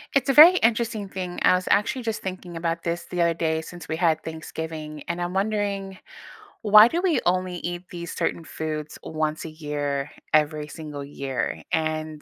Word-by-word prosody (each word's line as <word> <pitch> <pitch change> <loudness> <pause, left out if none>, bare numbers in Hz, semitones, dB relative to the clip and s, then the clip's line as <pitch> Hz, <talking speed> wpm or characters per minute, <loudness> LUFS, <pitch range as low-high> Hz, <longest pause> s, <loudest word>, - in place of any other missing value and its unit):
It's 275 0 +2
a - - +4
very 330 +6 +10
interesting 225 -2 +1
thing. 185 -2 -5
I - - +6
was 185 0 0
actually 230 +5 +2
just 225 -2 -3
thinking 185 -2 -6
about 165 0 -2
this 170 0 -2
the 180 -1 -2
other 170 0 +3
day 160 -1 0
since 175 0 -10
we 160 - -2
had 160 -2 +1
Thanksgiving, 160 -1 -6
and 170 +1 -3
I'm 175 +1 -2
wondering 200 -2 -1 0.6
why 215 0 +8
do 340 +7 -1
we 360 -4 +2
only 185 0 +1
eat 175 +1 -4
these 170 -1 -6
certain 165 - -1
foods 155 -1 -5
once 155 -1 -2
a - - -5
year, 145 -2 -3 0.2
every 150 0 +2
single 150 -2 -7
year? 140 -2 -4
And 155 -1 -2
170 Hz, 180 wpm, -25 LUFS, 155-195 Hz, 0.6 s, very